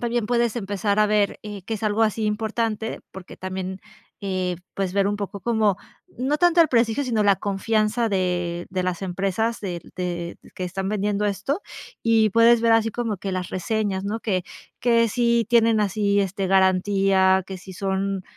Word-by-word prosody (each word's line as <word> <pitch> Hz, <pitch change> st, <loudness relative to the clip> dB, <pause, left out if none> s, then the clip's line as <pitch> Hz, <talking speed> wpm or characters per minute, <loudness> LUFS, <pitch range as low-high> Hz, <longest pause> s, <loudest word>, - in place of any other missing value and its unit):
también 240 Hz, -1 st, -1 dB
puedes 235 Hz, 0 st, +1 dB
empezar 205 Hz, 0 st, -1 dB
a 210 Hz, -, +5 dB
ver, 210 Hz, -1 st, +1 dB
eh, 210 Hz, -2 st, -7 dB
que 220 Hz, +4 st, -4 dB
es 210 Hz, -, -7 dB
algo 215 Hz, +1 st, +1 dB
así 220 Hz, 0 st, +1 dB
importante, 220 Hz, +1 st, -2 dB
porque 190 Hz, -1 st, -11 dB
también, 185 Hz, 0 st, -5 dB, 0.4 s
eh, 185 Hz, -2 st, -1 dB, 0.2 s
puedes 190 Hz, -2 st, -2 dB
ver 200 Hz, 0 st, +2 dB
un 205 Hz, -, -1 dB
poco 200 Hz, -1 st, -5 dB
como 220 Hz, -5 st, +1 dB, 0.4 s
no 275 Hz, +4 st, +1 dB
tanto 350 Hz, +1 st, +4 dB
el 325 Hz, -, +6 dB
prestigio, 235 Hz, +3 st, +2 dB
sino 225 Hz, -4 st, +1 dB
la 200 Hz, -2 st, +4 dB
confianza 215 Hz, +3 st, 0 dB
de-de 180 Hz, -1 st, -1 dB
las 180 Hz, -1 st, -2 dB
empresas 195 Hz, +4 st, -1 dB
del 175 Hz, -4 st, -6 dB
de 175 Hz, -1 st, -4 dB, 0.2 s
que 185 Hz, -, -4 dB
están 190 Hz, +2 st, -3 dB
vendiendo 210 Hz, 0 st, 0 dB
esto. 210 Hz, -, -1 dB, 0.4 s
Y 225 Hz, -1 st, +4 dB
puedes 230 Hz, +2 st, +5 dB
ver 230 Hz, -1 st, +4 dB
así 225 Hz, 0 st, +3 dB
como 230 Hz, -2 st, -2 dB
que 195 Hz, +1 st, -5 dB
las 185 Hz, -1 st, -3 dB
reseñas, 195 Hz, 0 st, -2 dB
¿no?, 220 Hz, +3 st, -3 dB
que 185 Hz, -5 st, -1 dB, 0.3 s
que 230 Hz, -1 st, +3 dB
si 235 Hz, 0 st, +2 dB
tienen 230 Hz, -2 st, +4 dB
así, 200 Hz, 0 st, +1 dB
este, 195 Hz, 0 st, -2 dB
garantía, 190 Hz, 0 st, +3 dB
que 190 Hz, -, -6 dB
si 190 Hz, +1 st, -11 dB
son, 195 Hz, 0 st, -2 dB
205 Hz, 175 wpm, -23 LUFS, 190-225 Hz, 0.4 s, el